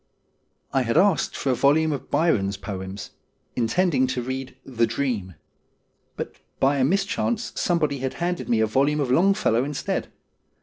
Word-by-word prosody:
I 135 - +3
had 115 -2 0
asked 195 -7 +3
for 135 - 0
a - - +2
volume 155 +5 +3
of 140 - -5
Byron's 105 - +1
poems, 95 0 -6 0.4
intending 130 +3 +2
to 125 -1 -2
read 130 +1 -5
' - - -38
The 115 - +5
Dream,' 115 - -2 0.8
but - - -5 0.2
by 140 +2 +3
a - - +3
mischance 200 - 0
somebody 150 -5 0
had 130 0 -3
handed 175 0 -2
me 115 -2 +3
a - - +4
volume 140 +7 +1
of 135 -4 0
Longfellow 175 - +3
instead. 140 -1 -3
135 Hz, 160 wpm, -24 LUFS, 115-160 Hz, 0.8 s, The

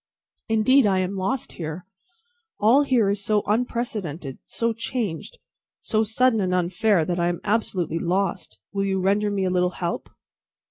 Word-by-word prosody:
"Indeed 225 +3 +4
I 190 -2 +2
am 185 +1 -1
lost 200 +7 -2
here. 160 +1 -6 0.7
All 230 +7 +5
here 255 -7 +2
is 200 0 -2
so 210 0 +2
unprecedented, 210 - -2
so 230 0 -1
changed, 225 - -4 0.5
so 215 -2 +1
sudden 225 +1 +2
and 180 -1 0
unfair, 180 0 +2
that 175 +1 -2
I 170 - +2
am 175 -1 -1
absolutely 195 -6 0
lost. 185 +2 -1 0.2
Will 195 0 0
you 190 -1 0
render 200 +3 +2
me 200 -2 -1
a 185 - 0
little 180 0 +2
help?" 170 -1 -3
200 Hz, 155 wpm, -24 LUFS, 180-225 Hz, 0.7 s, All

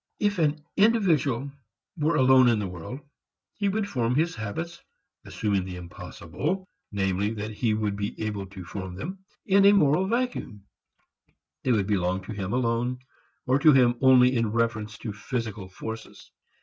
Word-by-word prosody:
If 205 -2 +1
an 150 -1 +1
individual 165 - +2 0.4
were 155 0 +1
alone 130 -2 +6
in 120 -2 +4
the 105 - -2
world, 90 - -7 0.5
he 200 -2 -1
would 205 +1 -1
form 125 - 0
his 165 +4 +1
habits 160 +11 -5 0.4
(assuming 100 -3 -1
the 90 -1 -7
impossible, 90 - -5 0.2
namely, 100 +1 0
that 105 +1 -4
he 110 0 0
would 105 -2 -1
be 100 0 -4
able 105 -3 -3
to 95 -2 -10
form 95 -1 -6
them) 180 - -6 0.3
in 195 0 +4
a 200 +1 +7
moral 175 0 +3
vacuum. 235 - -2 1.0
They 130 - +2
would 105 -5 +2
belong 95 -2 0
to 105 - -8
him 100 -2 -4
alone, 120 +1 0 0.5
or 130 +2 +3
to 155 0 +7
him 125 -3 +5
only 130 -1 +6
in 115 -3 +1
reference 115 -2 -1
to 110 - -5
physical 105 -3 -4
forces. 110 +4 -8
115 Hz, 160 wpm, -26 LUFS, 100-150 Hz, 1.0 s, a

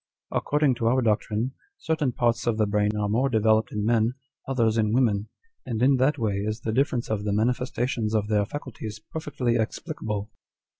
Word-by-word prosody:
According 150 -2 +2
to 115 - 0
our 130 +2 +3
doctrine, 110 +2 0 0.3
certain 155 -5 0
parts 120 -1 0
of 115 -2 +2
the 110 - +3
brain 105 +1 +1
are 105 -1 0
more 120 +6 +2
developed 110 -1 +3
in 105 -1 -2
men, 115 +1 +2 0.3
others 115 -5 +2
in 110 -1 +1
women; 110 -5 +2 0.3
and 115 -3 -3
in 135 +1 +5
that 140 +3 +2
way 110 -5 0
is 110 +3 -2
the 110 - -2
difference 125 -2 0
of 105 -2 -1
the 105 - -1
manifestations 120 0 0
of 105 -1 +1
their 105 -1 +2
faculties 115 -6 -6
perfectly 135 -7 -1
explicable." 110 - -3
115 Hz, 180 wpm, -26 LUFS, 105-130 Hz, 0.3 s, in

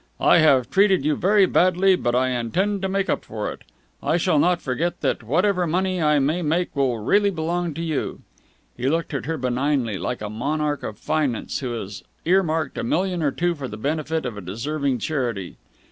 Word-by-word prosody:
I - - +5
have 135 -6 +4
treated 195 -6 +3
you 150 -1 +2
very 200 +2 +4
badly, 185 +1 +3
but 120 -8 -1
I 130 +1 +2
intend 180 - -1
to 190 - -1
make 195 0 0
up - - -1
for 105 -1 -4
it. - - -11 0.4
I 165 - +1
shall 170 -3 +2
not 175 +2 +3
forget 155 +7 -2
that - - 0
whatever 180 - +1
money 185 +2 0
I 150 -1 +3
may 150 +6 +1
make 165 +2 -1
will 135 -4 +1
really 200 - +2
belong 170 -2 -2
to 165 - -4
you." 160 -3 -3 0.5
He 130 - -1
looked 165 +1 -1
at 135 -2 -3
her 160 0 -1
benignly, 125 -3 0
like 125 -3 -3
a - - -3
monarch 145 +5 -1
of 105 - -6
finance 140 -6 -1
who 125 -3 -3
has 100 -3 -6 0.2
earmarked 165 -5 +1
a - - -2
million 180 +7 0
or 150 - +2
two 175 +5 0
for 145 -5 -6
the 105 - -7
benefit 155 +5 -2
of 120 -4 -4
a - - -6
deserving 135 - -2
charity. 120 - -3
155 Hz, 200 wpm, -23 LUFS, 125-175 Hz, 0.5 s, I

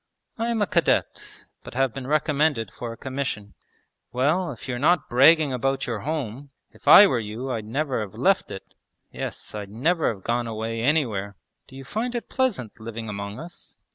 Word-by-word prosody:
'I 230 - 0
am 230 -2 0
a - - +2
cadet, 170 -3 -1 0.2
but - - -10
have 135 -2 +1
been 135 -2 -6
recommended 150 -5 +1
for 120 -1 -6
a 115 - -9
commission.' 130 -6 -4 0.6
'Well, 155 +8 +1
if 125 - -10
you're 125 -2 -3
not 160 +3 +3
bragging 145 +3 +6
about 135 +2 0
your 115 -3 -3
home, 140 -1 -4 0.2
if - - -21
I 205 - +11
were 130 -11 +1
you 115 +5 -5
I'd 110 -3 -3
never 135 +2 -1
have 105 0 -7
left 190 - +2
it! 95 - -9 0.4
Yes, - - -6
I'd 105 -2 -6
never 155 - +1
have 100 -4 -10
gone 120 0 0
away 115 +1 -3
anywhere. 115 -8 0 0.3
Do 130 - -14
you 135 - -8
find 230 - -3
it 240 - -4
pleasant 220 - -1
living 110 0 -6
among 100 0 -5
us?' 170 +2 -12
130 Hz, 185 wpm, -24 LUFS, 110-155 Hz, 0.6 s, I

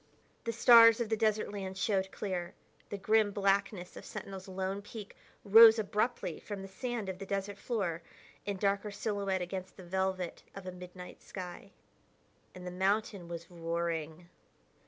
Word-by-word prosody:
The 230 - 0
stars 230 0 +8
of 235 -2 -1
the 220 - +2
desert 215 -1 +1
land 190 -2 -5
showed 190 -1 0
clear; 180 -4 -4 0.3
the 205 - -4
grim 215 +2 +3
blackness 195 -2 0
of - - -9
Sentinel's 195 -1 -7
lone 190 +1 -3
peak 205 0 -9 0.3
rose 225 +2 +9
abruptly 210 -4 -1
from 205 -2 -6
the - - -7
sand 225 +2 -4
of 190 -1 -5
the 195 - -6
desert 200 0 -3
floor 190 -9 -2 0.4
in 200 -1 -3
darker 200 +1 0
silhouette 200 -2 -1
against 185 +1 -6
the 190 - -10
velvet 190 0 -2
of 195 -1 -8
a 185 - -4
midnight 180 0 -10
sky. 185 +1 -8 0.9
And 180 0 -9
the 180 - -4
mountain 195 0 0
was 170 +1 -7
roaring. 165 -1 -3
195 Hz, 155 wpm, -32 LUFS, 180-210 Hz, 0.9 s, rose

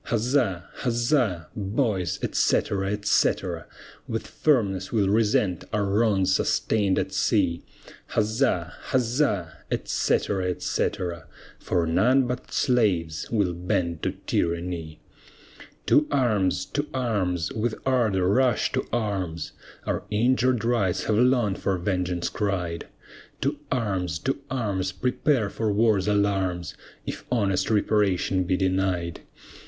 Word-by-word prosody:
Huzza! 115 -6 +1
huzza! 120 - +1
boys, 100 - -1
etc., 95 -1 +1
etc. 105 0 +1 0.4
With - - -3
firmness 100 -10 +1
we'll 105 -4 +2
resent 105 -4 +2
our 105 -1 0
wrongs 100 -2 +2
sustain'd 100 0 +1
at - - -1
sea; 85 0 +1 0.5
Huzza! 105 - +1
huzza! 120 - 0
etc., 100 -2 0
etc. 90 -1 -2 0.3
For 85 -2 0
none 125 +11 +3
but 125 0 -5
slaves 95 - +1
will 100 -6 +1
bend 85 -1 -1
to - - -1
tyranny. 85 -2 -2 0.9
To 150 - +4
arms, 105 -10 +1
to 145 +1 -3
arms, 95 -9 0
with 110 0 -1
ardor 110 -8 +2
rush 125 +3 +2
to - - 0
arms, 95 -8 -2 0.3
Our - - -1
injured 125 +2 +2
rights 110 -7 +1
have 110 - +1
long 125 -5 +3
for 95 0 -1
vengeance 90 -1 -1
cried. 90 -5 -2 0.5
To 140 +2 -1
arms, 95 - -1
to 135 - 0
arms, 100 -7 -1
prepare 125 0 0
for 110 -2 -1
war's 105 -2 +2
alarms, 95 -4 0 0.3
If - - -5
honest 100 -6 +1
reparation 100 -3 +2
be 90 +1 +1
denied. 95 -2 0
100 Hz, 115 wpm, -25 LUFS, 90-120 Hz, 0.9 s, To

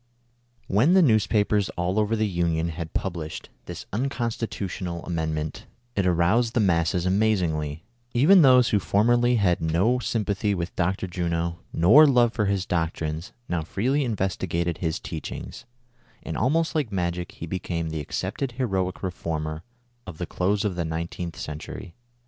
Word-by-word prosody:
HEN 120 - +3
the 190 - +7
newspapers 105 - +2
all 90 +4 0
over 105 +1 +1
the 110 0 +1
Union 85 -3 0
had 80 -1 -6
published 85 -5 -4 0.2
this - - -7
unconstitutional 110 -8 -3
Amendment, 80 -3 -3 0.3
it 95 -2 +1
aroused 95 +8 +2
the - - +3
masses 90 -2 +2
amazingly; 90 -7 0 0.3
even 170 +10 +6
those 125 -4 +6
who 105 - +3
formerly 120 +5 +3
had 95 -6 +2
no 90 +10 +2
sympathy 105 -4 -1
with 85 -1 -4
Dr. 95 +2 0
Juno, 85 -1 -2
nor 120 - +7
love 120 -4 +4
for 110 -2 0
his 100 -2 0
doctrines, 80 -1 -2 0.2
now 90 -2 -1
freely 125 - 0
investigated 95 - -1
his 80 -3 -1
teach - - -6
ings, - - -8 0.6
and - - -5
almost 160 +5 +1
like 145 -8 -1
magic 90 -2 -2
he - - -7
became 85 -2 -3
the 80 -1 -3
accepted 125 - -3
heroic 95 -8 -2
reformer 80 -3 -3 0.5
of 85 -4 -8
the 90 - -3
close 100 +5 0
of 100 -3 -1
the 85 - -1
nineteenth 85 +1 -4
century. 75 +3 -7
95 Hz, 150 wpm, -25 LUFS, 85-110 Hz, 0.6 s, the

